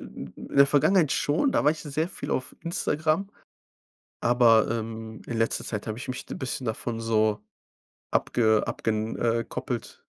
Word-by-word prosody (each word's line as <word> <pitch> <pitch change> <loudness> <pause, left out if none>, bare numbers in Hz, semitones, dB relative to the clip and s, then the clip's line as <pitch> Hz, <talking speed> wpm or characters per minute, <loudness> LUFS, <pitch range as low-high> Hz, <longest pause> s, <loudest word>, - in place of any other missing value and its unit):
in - - -9
der 140 0 +4
Vergangenheit 150 +2 +4
schon, 155 - +2
da - - +2
war 150 - +6
ich 155 - -4
sehr 155 +3 -2
viel - - -5
auf 130 +2 -2
Instagram. 165 +2 0 0.9
Aber, 120 -2 +5
ähm, 110 -1 -5
in 115 - -3
letzter 115 0 0
Zeit 105 -2 -4
habe 110 +1 -3
ich 130 - -7
mich 130 0 -5
d - - -7
bisschen 130 0 -4
davon 115 +1 -3
so 110 -2 +1 0.7
abge 110 -2 +2
abgen 110 0 -2
äh, 115 0 +1
koppelt. - - -5
120 Hz, 160 wpm, -26 LUFS, 110-145 Hz, 0.9 s, war